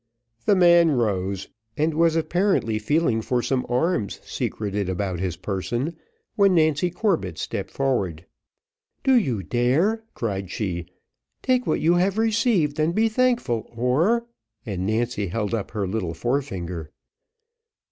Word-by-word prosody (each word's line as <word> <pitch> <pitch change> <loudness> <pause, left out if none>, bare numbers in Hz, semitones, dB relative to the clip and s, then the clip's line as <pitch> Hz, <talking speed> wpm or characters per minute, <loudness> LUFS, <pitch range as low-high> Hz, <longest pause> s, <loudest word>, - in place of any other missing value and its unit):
The 205 - +5
man 175 -2 +6
rose, 100 -8 -1 0.3
and 155 +2 +1
was 165 +1 +3
apparently 165 - +1
feeling 120 0 +1
for 120 +2 -1
some 130 -2 -1
arms 125 - 0
secreted 100 -2 -3
about 95 -1 -2
his 90 -2 -2
person, 105 - -3 0.4
when 200 -3 +4
Nancy 155 +1 +3
Corbett 175 - -1
stepped - - -4
forward. 100 - -1 0.8
"Do 265 - +4
you 130 - +1
dare?" 145 - +1
cried 100 -5 -3
she; 85 -5 -3 0.6
"take 255 -1 +1
what - - +1
you 165 +2 +4
have 185 +3 +2
received, 220 - +2
and 160 +3 +1
be 225 +1 +3
thankful, 230 - 0
or 160 - +2 0.2
" 115 -1 -50
and 95 -3 -3
Nancy 110 -1 -1
held 105 +4 -2
up 110 -4 -2
her 105 -3 -2
little 90 -4 -3
forefinger. 90 - -3
125 Hz, 135 wpm, -24 LUFS, -, 0.8 s, man